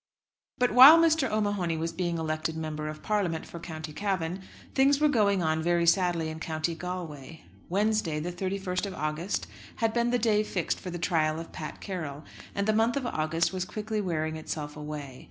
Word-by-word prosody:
But 250 0 +2
while 265 +8 +10
Mr. 320 -5 +3
O'Mahony 205 -6 0
was 165 +1 -2
being 170 0 -1
elected 160 0 -2
Member 155 -1 -4
of 155 0 -7
Parliament 190 -7 0
for 170 - -9
County 155 -2 -7
Cavan, 185 -1 -2 0.3
things 275 +1 +4
were 300 - +4
going 205 -9 +2
on 160 0 +1
very 170 +1 +2
sadly 170 -2 +2
in 160 0 -6
County 160 +1 -2
Galway. 165 -4 -6 0.3
Wednesday, 200 -4 +1
the 170 +3 -3
31st 190 +1 -2
of 195 - -6
August, 155 +5 -2 0.3
had 225 -2 0
been 235 0 +2
the 245 - +2
day 215 -3 +3
fixed 190 -5 -2
for 185 - -7
the 175 - -4
trial 160 -2 +1
of 165 - -8
Pat 155 - -7
Carroll; 155 -7 -5 0.3
and 200 +1 0
the 215 - +3
month 225 +4 +2
of 270 - -2
August 165 -3 0
was 185 -1 -1
quickly 215 +3 -3
wearing 160 -4 -2
itself 150 -1 -5
away. 150 -3 -7
175 Hz, 190 wpm, -28 LUFS, 160-210 Hz, 0.3 s, while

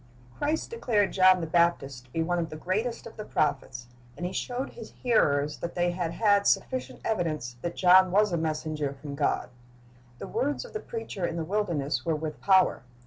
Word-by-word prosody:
Christ 310 +7 -1
declared 225 - +1
John 185 -1 +5
the - - -2
Baptist 160 -6 +1
to 125 - -25
be 165 - 0
one 175 +1 0
of 165 -1 -2
the - - -7
greatest 210 +9 -2
of 230 - -11
the 215 - -5
prophets, 130 - -1 0.3
and 175 - -4
He 180 - -3
showed 250 +6 -3
His 230 - -11
hearers 150 - +2
that 170 - -5
they 175 0 +1
had 175 -2 -3
had 205 -2 +3
sufficient 255 0 0
evidence 155 - -2
that 170 - -4
John 185 0 +6
was 205 +2 +3
a - - +2
messenger 155 -2 -2
from 145 -1 -7
God. 140 -2 0 0.7
The - - -7
words 285 - -2
of - - -13
the 435 - -3
preacher 450 - -6
in 165 - -4
the 165 - -2
wilderness 170 -7 -1
were 165 -2 0
with 155 0 -5
power. 190 -6 +4
175 Hz, 195 wpm, -28 LUFS, 155-210 Hz, 0.7 s, John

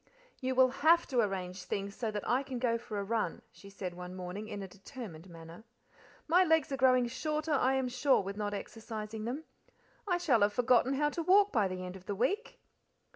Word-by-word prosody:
"You 260 -1 -1
will 260 0 +6
HAVE 335 +3 +6
to 255 - +1
arrange 190 -3 -1
things 200 0 -3
so 230 -3 -2
that 210 -1 -4
I 250 +2 +2
can 265 -2 -5
go 235 -1 +1
for 230 -3 -6
a 200 - -1
run," 215 -4 -2
she 200 - -14
said 190 -2 -6
one 180 +1 -8
morning, 185 +3 -6
in 205 -2 -5
a - - -6
determined 190 - -10
manner. 165 +3 -11 0.6
"My 355 +4 +5
legs 320 -4 +2
are 270 - -1
growing 255 -1 +4
shorter, 305 +5 -2
I 265 -1 +3
am 265 -1 0
sure, 255 +3 +3
with 195 +1 -5
not 205 -1 -2
exercising 220 0 -6
them. 265 +7 -3 0.6
I 355 -3 +2
shall 275 -11 +2
have 205 0 +3
forgotten 245 +2 +3
how 295 +2 +1
to 335 - -3
walk 395 +4 +5
by 210 -5 +2
the 185 0 -5
end 180 +1 -7
of 185 -1 -13
the 205 - -2
week." 390 - -1
230 Hz, 215 wpm, -32 LUFS, 200-270 Hz, 0.6 s, will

